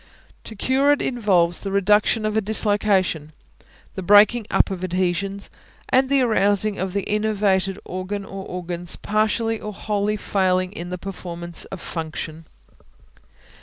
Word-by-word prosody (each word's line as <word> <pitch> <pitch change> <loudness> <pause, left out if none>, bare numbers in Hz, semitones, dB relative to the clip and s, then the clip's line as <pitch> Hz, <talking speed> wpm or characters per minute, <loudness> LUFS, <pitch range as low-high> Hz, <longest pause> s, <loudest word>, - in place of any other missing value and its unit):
To 220 - -8
cure 265 +7 +2
it 290 - +2
involves 190 -9 +1
the 195 - -4
reduction 210 +3 +3
of 215 0 -1
a 220 - +3
dislocation; 200 -7 +1 0.6
the - - -5
breaking 205 +4 +5
up - - +2
of 185 -1 -5
adhesions, 185 +2 -2 0.4
and 260 +1 +3
the 275 -1 +3
arousing 205 -2 +1
of 190 0 -3
the 200 -1 -2
enervated 200 -3 +1
organ 190 +2 -4
or 195 0 -7
organs 175 -1 -3
partially 220 +1 0
or 210 - -6
wholly 210 +1 -1
failing 185 -2 0
in 175 -3 -7
the 180 - -4
performance 175 -3 -5
of 195 - -8
function. 160 -1 -6
195 Hz, 140 wpm, -22 LUFS, 180-215 Hz, 0.6 s, breaking